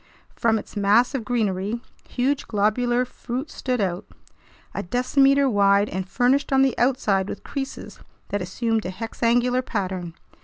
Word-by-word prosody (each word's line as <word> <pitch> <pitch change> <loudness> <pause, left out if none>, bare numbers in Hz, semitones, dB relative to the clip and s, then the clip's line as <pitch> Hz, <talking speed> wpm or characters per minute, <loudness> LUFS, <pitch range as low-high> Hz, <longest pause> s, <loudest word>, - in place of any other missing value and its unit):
From 225 -1 +2
its 215 - -9
mass 210 +6 +3
of 265 -4 -2
greenery, 215 -2 -1 0.3
huge 270 +3 -1
globular 240 +4 +1
fruit 250 +4 -6
stood 250 -2 -2
out, 185 -3 -1 0.7
a - - -2
decimeter 270 +7 +3
wide 200 -2 +3
and 190 0 -4
furnished 260 +5 +2
on 270 0 +5
the 265 -2 +2
outside 215 -7 +1
with - - -7
creases 270 -1 -6 0.3
that 205 - -2
assumed 225 +4 -1
a - - -3
hexangular 235 +4 0
pattern. 185 -7 -4
235 Hz, 145 wpm, -23 LUFS, 200-255 Hz, 0.7 s, on